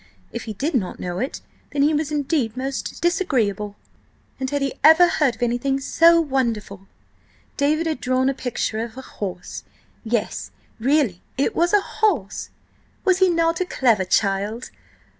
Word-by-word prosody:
If - - -6
he 220 - -5
did 285 - -2
not 200 -9 -1
know 180 0 -4
it, 260 +5 -3 0.3
then 285 -1 +1
he 300 +2 +3
was 305 0 -1
indeed 285 -6 -1
most 270 +4 -4
disagreeable. 220 - 0 0.6
And 260 0 -2
had 285 0 -1
he 275 - -1
ever 320 +4 +8
heard 290 -7 +1
of 225 - -4
anything 245 +3 0
so 335 +5 +5
wonderful?–David 265 - -3
had 315 -5 -2
drawn 255 +1 +1
a 270 - +2
picture 245 -4 -3
of 230 +1 -5
a 265 - -7
horse! 185 -7 -6 0.4
Yes, 230 -1 -2 0.3
really, 255 - +1 0.2
it 275 - 0
was 345 +1 +2
a 415 - +5
horse! 380 - -1 0.6
Was 375 -1 +3
he 375 -1 +5
not 330 0 +1
a - - +1
clever 230 - +2
child? 200 +4 0
265 Hz, 160 wpm, -22 LUFS, 220-310 Hz, 0.6 s, ever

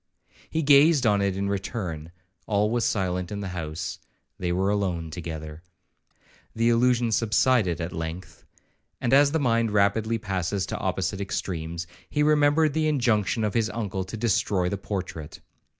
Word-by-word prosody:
He 160 0 -1
gazed 145 0 +5
on 105 -2 +3
it 100 -1 0
in 100 0 -1
return,—all 95 0 -3
was 120 -1 +1
silent 90 -2 -1
in 100 0 -4
the 100 - -4
house,—they 85 +1 -6
were 95 +3 +1
alone 90 -6 -1
together. 80 -2 -7 0.9
The 115 +1 +2
illusion 120 0 +3
subsided 110 - +2
at 85 0 -4
length; 80 +2 -6 0.6
and 125 - 0
as 140 +1 +6
the 160 - +1
mind 115 -5 +2
rapidly 105 +2 +2
passes 95 -2 -2
to - - -4
opposite 95 +1 -2
extremes, 85 -3 -4 0.2
he 150 - +1
remembered 150 0 +3
the 155 0 +1
injunction 120 -6 +1
of 105 -2 0
his 115 -1 +1
uncle 100 -4 -3
to 105 +4 -7
destroy 100 -4 +1
the 100 - -2
portrait. 90 -7 -5
100 Hz, 150 wpm, -26 LUFS, 90-115 Hz, 0.9 s, as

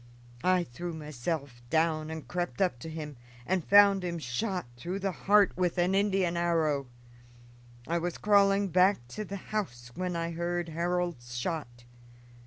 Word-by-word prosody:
I 185 -1 +3
threw 170 +5 -6
myself 150 -3 -4
down 160 0 +1
and 160 -1 -6
crept 175 +1 -3
up 180 -11 +1
to 160 - -7
him 150 -3 -6 0.3
and 185 +2 0
found 200 0 +6
him 175 -1 -2
shot 180 - -2
through 175 +10 -4
the 195 0 -1
heart 200 +2 +3
with 180 0 0
an 180 +2 +2
Indian 195 -3 +2
arrow. 160 -5 +1 1.0
I 170 +1 +1
was 175 +1 -3
crawling 200 -1 +4
back 180 -7 +3
to 215 +10 -5
the 200 -1 -6 0.2
house 125 - -3
when 180 +2 -3
I 165 0 -2
heard 170 0 -2
Harold's 170 -7 -2
shot. 120 -4 -4
170 Hz, 155 wpm, -30 LUFS, 155-185 Hz, 1.0 s, found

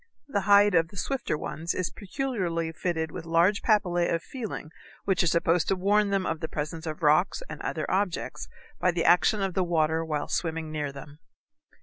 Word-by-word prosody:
The 205 -8 -1
hide 205 0 +7
of 165 -2 +4
the 200 - -14
swifter 265 - -2
ones 165 +3 -4
is 185 - -2
peculiarly 185 - -3
fitted 160 -1 -2
with 180 - -6
large 170 +5 +3
papillæ 180 -6 +2
of 165 0 -1
feeling 220 - -6 0.3
which 195 -2 +2
are 175 - +2
supposed 170 +1 +2
to 195 - +2
warn 200 +2 +2
them 195 -1 0
of 165 - -2
the 160 - -3
presence 160 +2 -5
of 155 +2 -5
rocks 155 - +3
and - - -8
other - - -2
objects 190 -2 -2 0.3
by 180 - +2
the 175 -1 0
action 185 +4 +4
of 190 -2 -1
the 185 - +1
water 160 -2 +1
while 150 -2 -2
swimming 160 -2 -2
near 150 -2 -3
them. 145 +2 -11
175 Hz, 195 wpm, -27 LUFS, 160-195 Hz, 0.3 s, hide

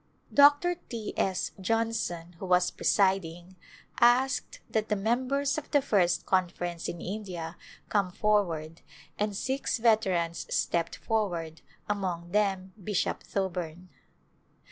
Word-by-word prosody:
Dr. 290 +5 +6
1\ 225 -3 -5
S. 190 -1 0
Johnson, 215 -5 -1
who - - -5
was 180 0 +3
presiding, 190 -2 +1 0.4
asked 255 +2 +3
that 220 -1 -1
the 210 - +2
mem 235 +6 0
bers 280 +2 +1
of 305 - -14
the 290 - +4
First 195 -10 +2
Conference 175 -2 -1
in 170 - -5
India 180 -4 -5 0.3
come 200 -3 +1
forward 175 -6 0 0.4
and 210 -1 0
six 265 +3 -1
veterans 190 -8 +1
stepped 170 -1 0
forward, 175 -8 -2 0.3
among 180 -4 -2
them 195 -2 0
Bishop 205 -1 -1
Thoburn. 180 -2 -4
195 Hz, 120 wpm, -29 LUFS, 175-225 Hz, 0.4 s, Dr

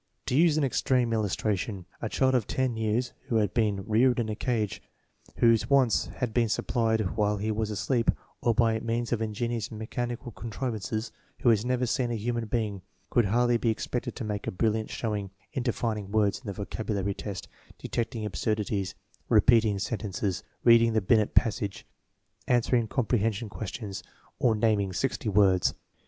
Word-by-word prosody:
To - - -1
use 160 0 +5
an 155 - +2
extreme 125 -2 +1
illustration, 105 -2 -1 0.2
a 115 - -2
child 130 +3 +2
of 125 -5 +1
ten 130 -2 0
years 110 +3 -1
who 115 - -1
had 105 -4 +2
been 105 -4 +1
reared 120 +3 +3
in 115 -2 -1
a 105 - -2
cage, 110 -4 -1 0.5
whose 115 +1 +3
wants 135 -4 +4
had 120 -3 -4
been 115 -1 +2
supplied 110 -3 0
while 105 -1 +1
he 105 +2 -1
was 110 0 -1
asleep, 115 +3 0 0.3
or 120 -2 +2
by 115 -2 +3
means 115 +1 -2
of 115 - -1
ingenious 115 +1 -2
mechan 120 +2 -4
ical 120 -2 -10
contrivances, 110 -2 -3 0.3
who 120 - +4
had 110 -2 +4
never 125 0 0
seen 125 0 0
a 120 - -1
human 115 +1 -2
being, 105 -4 -2 0.3
could 120 - +4
hardly 120 +4 +3
be 115 - 0
expected 120 +2 -2
to 130 - -5
make 105 -1 -4
a - - 0
brilliant 110 +3 0
showing 105 -4 -3 0.2
in 135 - -1
defining 110 -4 -2
words 105 -1 +2
in 125 - -14
the 100 - -2
vocabulary 100 -1 -2
test, 100 -2 -6 0.3
detecting 115 -2 -3
absurdities, 105 -2 -1 0.3
repeating 110 -2 +5
sentences, 100 -3 -2 0.2
reading 115 -1 +6
the 110 - +2
Binet 105 +2 +2
passage, 100 -3 +1 0.6
answering 120 -1 +2
comprehension 115 -2 0
questions, 100 +1 -6 0.4
or 115 -3 +3
nam 110 -1 +2
ing 95 -2 -2
sixty 120 +2 -1
words. 95 -3 +3
110 Hz, 170 wpm, -28 LUFS, 105-120 Hz, 0.6 s, reading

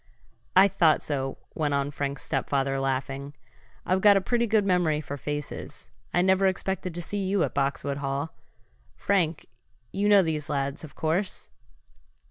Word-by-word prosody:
"I 190 +2 +8
thought 170 -5 +3
so," 135 -2 -2 0.2
went 150 -2 0
on 140 0 -1
Frank's 140 -1 -3
stepfather, 135 -1 0
laughing. 135 +1 -3 0.5
"I've 185 +1 +1
got 205 -1 +7
a - - +4
pretty 235 +5 0
good 215 -2 +3
memory 175 -5 +2
for 145 -2 -6
faces. 145 +1 -6 0.2
I 175 - +2
never 190 +1 +4
expected 190 -1 -2
to 175 - -4
see 205 +3 -3
you 190 -1 +1
at - - -2
Boxwood 140 0 -1
Hall. 140 +2 -3 0.6
Frank, 175 -5 0 0.5
you 205 +1 +1
know 200 -2 +7
these 155 -3 -2
lads, 140 +1 -2
of 155 - -11
course?" 170 +5 -2
155 Hz, 155 wpm, -27 LUFS, 140-190 Hz, 0.6 s, I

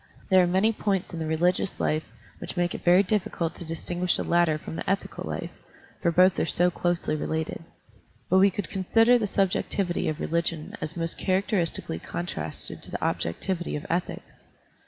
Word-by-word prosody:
There 185 0 +7
are - - +2
many 190 +5 +3
points 195 -4 -1
in 170 - -4
the 160 - -2
religious 175 +4 +1
life 155 +1 0 0.4
jvhich - - -5
make 175 0 +1
it - - -7
very 180 +3 +6
difficult 180 -4 -1
to - - -7
distinguish 175 +2 -1
the - - -2
latter 170 -3 +3
from 155 - -8
the - - -4
ethical 195 +1 -2
life, - - -4 0.5
for 170 - +2
both 185 +2 +5
are - - +2
so 180 +2 +3
closely 175 -2 -1
related. 160 +1 -3 0.6
But 185 - +4
we 195 +1 +6
could 195 -2 -4
consider 225 +5 +4
the 215 - 0
subjectivity 190 -1 0
of 155 +1 -3
religion 165 -1 -2
as 165 +3 -4
most 165 0 -2
characteristically 185 - 0
contrasted 80 -3 -3
to - - -7
the - - -4
objectivity 175 - -2
of 150 - -5
ethics. 175 +1 -4
175 Hz, 180 wpm, -26 LUFS, 165-190 Hz, 0.6 s, There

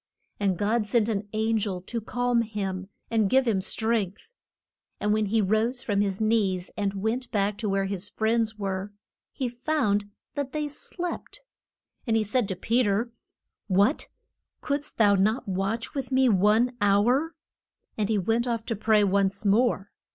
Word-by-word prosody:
And 195 -3 +1
God 210 +2 +1
sent 225 +1 +2
an 205 -2 -2
an 220 +1 +1
gel 195 -3 -2
to 230 +5 -4
calm 245 +2 +1
him 195 -4 -4 0.2
and 220 -3 +2
give 260 +2 +3
him 200 -4 +2
strength. 220 - -1 0.7
And 210 0 +1
when 215 -1 +1
he 220 +2 +2
rose 220 +5 +1
from 205 -2 +1
his 195 -2 -1
knees 205 -5 +1
and 200 -1 -1
went 240 +4 -1
back 205 -2 0
to 215 - -1
where 195 0 +1
his 195 0 -4
friends 225 0 0
were, 195 0 -3 0.4
he 260 - -2
found 235 -5 0 0.2
that 285 -2 -4
they 300 -1 -1
slept. 350 - -5 0.7
And 225 -1 +3
he 220 - +2
said 215 +1 0
to 190 - -3
Pe 230 +7 +1
ter, 225 +2 0 0.6
What, 200 +8 +2 0.5
couldst 285 0 -3
thou 205 -3 +5
not 215 +5 +1
watch 195 +5 -2
with 270 -2 -4
me 260 0 +4
one 215 +5 +3
hour? 240 +11 +3 0.6
And 210 -1 -1
he 220 - +2
went 225 +5 +1
off 230 -2 -2
to 230 - -2
pray 215 0 +3
once 200 +1 +1
more. 205 -1 +2
215 Hz, 165 wpm, -26 LUFS, 200-235 Hz, 0.7 s, thou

